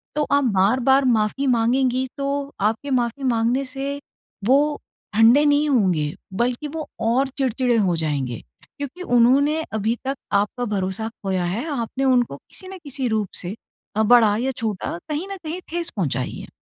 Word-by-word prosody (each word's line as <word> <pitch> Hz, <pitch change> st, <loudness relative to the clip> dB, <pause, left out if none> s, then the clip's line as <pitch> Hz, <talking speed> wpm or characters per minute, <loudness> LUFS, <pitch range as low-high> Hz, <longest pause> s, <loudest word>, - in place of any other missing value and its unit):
तो 300 Hz, -, +2 dB
आप 285 Hz, 0 st, +4 dB
बार-बार 260 Hz, +7 st, +4 dB
माफ़ी 235 Hz, +3 st, +1 dB
माँगेंगी 255 Hz, +2 st, +2 dB
तो 280 Hz, 0 st, -2 dB
आपके 220 Hz, +7 st, 0 dB
माफ़ी 245 Hz, +1 st, 0 dB
माँगने 245 Hz, +2 st, +1 dB
से 275 Hz, +2 st, -4 dB, 0.5 s
वो 265 Hz, +5 st, +5 dB, 0.5 s
ठंडे 230 Hz, +7 st, +6 dB
नहीं 295 Hz, +1 st, +3 dB
होंगे 180 Hz, -, +2 dB, 0.2 s
बल्कि 240 Hz, +7 st, -1 dB
वो 310 Hz, +1 st, -5 dB
और 245 Hz, +5 st, +2 dB
चिड़चिड़े 255 Hz, -2 st, +1 dB
हो 190 Hz, -5 st, +2 dB
जाएँगे 140 Hz, -7 st, -2 dB, 0.4 s
क्योंकि 285 Hz, +5 st, -6 dB
उन्होंने 280 Hz, +6 st, +4 dB
अभी 220 Hz, +2 st, 0 dB
तक 270 Hz, +1 st, -1 dB, 0.2 s
आपका 205 Hz, +5 st, +1 dB
भरोसा 200 Hz, 0 st, -2 dB
खोया 190 Hz, -5 st, -2 dB
है 195 Hz, -, -2 dB
आपने 235 Hz, +3 st, -3 dB
उनको 245 Hz, -, +2 dB
किसी 370 Hz, -, -12 dB
न 380 Hz, 0 st, -8 dB
किसी 275 Hz, -3 st, -2 dB
रूप 215 Hz, -3 st, 0 dB, 0.2 s
से 180 Hz, +4 st, -4 dB, 0.4 s
अ, 220 Hz, -, +3 dB
बड़ा 220 Hz, -2 st, +5 dB
या 255 Hz, +4 st, 0 dB
छोटा 210 Hz, -6 st, -3 dB
कहीं 305 Hz, +5 st, -2 dB
न 395 Hz, -, -4 dB
कहीं 325 Hz, +4 st, -4 dB
ठेस 340 Hz, 0 st, -2 dB
पहुँचाई 140 Hz, -8 st, -1 dB
है। -, -, -9 dB
245 Hz, 165 wpm, -22 LUFS, 215-275 Hz, 0.5 s, ठंडे